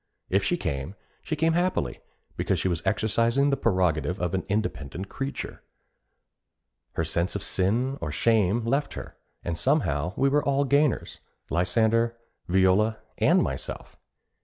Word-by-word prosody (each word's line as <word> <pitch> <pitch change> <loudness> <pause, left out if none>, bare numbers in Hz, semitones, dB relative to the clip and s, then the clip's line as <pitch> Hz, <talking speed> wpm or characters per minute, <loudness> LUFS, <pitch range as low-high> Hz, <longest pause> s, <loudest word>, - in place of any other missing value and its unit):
If - - +3
she - - +1
came, 70 +7 -3 0.3
she 155 - -3
came 160 +2 +2
happily, 175 - 0 0.4
because - - 0
she - - 0
was 85 -2 -1
exercising 115 +7 +2
the - - +3
prerogative 90 - +1
of 90 -1 -1
an 95 - 0
independent 95 -4 -2
creature. 135 +1 -5 1.3
Her 80 - -1
sense 85 +4 -1
of 100 - -1
sin 115 +9 +1
or 75 - -3
shame 110 +3 +2
left 140 +5 0
her; - - -8 0.3
and 85 - -2
somehow 85 - +1
we 135 - +2
were 145 +2 +2
all 140 0 +2
gainers, 140 -1 +1 0.3
Lysander, 110 +7 +2 0.3
Viola, 95 +4 +3 0.2
and - - +4
myself. - - -5
105 Hz, 140 wpm, -26 LUFS, 90-135 Hz, 1.3 s, and